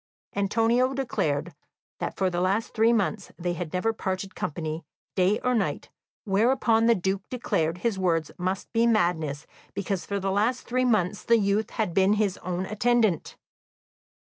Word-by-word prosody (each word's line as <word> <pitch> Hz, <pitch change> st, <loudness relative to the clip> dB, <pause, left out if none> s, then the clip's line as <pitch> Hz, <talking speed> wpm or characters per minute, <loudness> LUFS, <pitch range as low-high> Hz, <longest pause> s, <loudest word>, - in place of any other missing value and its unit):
Antonio 230 Hz, +6 st, +2 dB
declared 165 Hz, -, -1 dB, 0.5 s
that -, -, -3 dB
for 190 Hz, -1 st, +1 dB
the 175 Hz, 0 st, -1 dB
last 200 Hz, +5 st, 0 dB
three 225 Hz, +1 st, +4 dB
months 215 Hz, -2 st, 0 dB
they 175 Hz, 0 st, -2 dB
had 170 Hz, -2 st, -5 dB
never 225 Hz, +5 st, 0 dB
parted 190 Hz, -2 st, -3 dB
company, 155 Hz, +1 st, -4 dB, 0.3 s
day 190 Hz, +3 st, +3 dB
or 250 Hz, -, +1 dB
night, 220 Hz, -5 st, -1 dB, 0.4 s
whereupon 225 Hz, +2 st, +3 dB
the 235 Hz, -, +5 dB
Duke 190 Hz, +1 st, -1 dB
declared 165 Hz, -9 st, -1 dB
his 200 Hz, +1 st, -1 dB
words 165 Hz, -4 st, +1 dB
must 185 Hz, +2 st, -3 dB
be 230 Hz, 0 st, +3 dB
madness, 165 Hz, -9 st, +1 dB, 0.3 s
because 195 Hz, -2 st, -2 dB
for 200 Hz, 0 st, -1 dB
the 195 Hz, 0 st, -1 dB
last 220 Hz, +6 st, +1 dB
three 255 Hz, +1 st, +1 dB
months 205 Hz, -5 st, +1 dB
the 230 Hz, -, +4 dB
youth 205 Hz, +1 st, +1 dB
had 215 Hz, -7 st, -2 dB
been 190 Hz, +3 st, +4 dB
his 205 Hz, -3 st, +1 dB
own 180 Hz, +1 st, -3 dB
attendant. 215 Hz, -2 st, +1 dB
200 Hz, 160 wpm, -26 LUFS, 180-225 Hz, 0.5 s, the